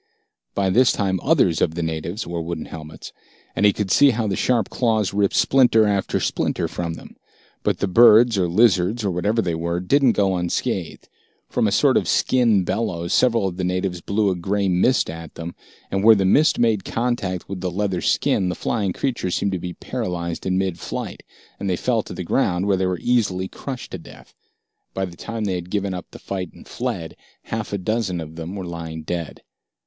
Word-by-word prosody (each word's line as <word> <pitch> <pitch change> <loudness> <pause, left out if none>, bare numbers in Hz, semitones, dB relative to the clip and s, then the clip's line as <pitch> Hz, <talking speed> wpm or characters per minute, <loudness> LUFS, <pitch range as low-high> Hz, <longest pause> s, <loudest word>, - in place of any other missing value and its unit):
By 95 -1 +1
this 125 +6 +5
time, 95 -2 0
others 130 - +2
of 80 - +1
the 85 - -2
natives 80 +6 -3
wore 85 0 -4
wooden 85 -1 -4
helmets, 80 -1 -10 0.4
and 105 - +4
he - - +5
could 100 -1 -3
see 145 - +6
how 115 -3 0
the 100 -2 -1
sharp 115 -2 +1
claws 110 -5 +1
ripped 100 -1 +1
splinter 120 -5 +4
after 100 -2 0
splinter - - -1
from 85 -2 -4
them. - - -13 0.4
But - - 0
the 100 - -1
birds 115 +3 +6
or 95 -3 +1
lizards, 100 +2 +2
or 100 - +1
whatever 105 +6 0
they 85 - -1
were, 85 +1 -2
didn't 130 +7 +3
go 95 -2 +1
unscathed. 90 -1 -3 0.4
From - - +1
a - - 0
sort - - +4
of - - 0
skin 115 -7 +3
bellows, 85 -3 -2
several 115 -5 +3
of 90 -1 -5
the 95 - -2
natives 90 0 -1
blew 100 +2 +1
a - - -1
gray 100 +3 -1
mist 95 +8 +2
at 80 -1 -8
them, 85 +1 -6 0.4
and 95 0 0
where 110 0 +8
the 95 -2 +1
mist 150 +11 +4
made 110 -5 +2
contact 115 -7 -2
with 95 -2 -6
the 90 - -1
leather 95 0 -1
skin, 90 - +1
the 90 - -2
flying 100 -5 -1
creatures 115 -9 -2
seemed 100 - 0
to 95 - -2
be 90 0 -5
paralyzed 90 -9 -4
in 95 0 +1
mid 95 -3 -1
flight, - - -5 0.4
and 100 - -2
they 90 - +1
fell 115 +4 0
to - - -9
the 90 - -4
ground, 90 -2 +1
where 100 -1 +3
they 95 0 0
were 90 -1 -1
easily 100 -6 +1
crushed 130 +5 -7
to 95 - -5
death. - - -15 0.6
By 95 - 0
the 90 -2 -10
time 115 +4 -5
they 100 -3 -1
had 90 0 -5
given 100 -1 -1
up 90 -2 -6
the - - -11
fight 95 -3 -5
and - - -15
fled, 115 -10 -4 0.3
half 110 -2 -4
a 100 - -1
dozen 100 -2 -1
of 80 0 -8
them 85 +3 -6
were 95 -2 -5
lying 80 -2 -6
dead. 85 -1 -5
95 Hz, 210 wpm, -22 LUFS, 90-110 Hz, 0.6 s, where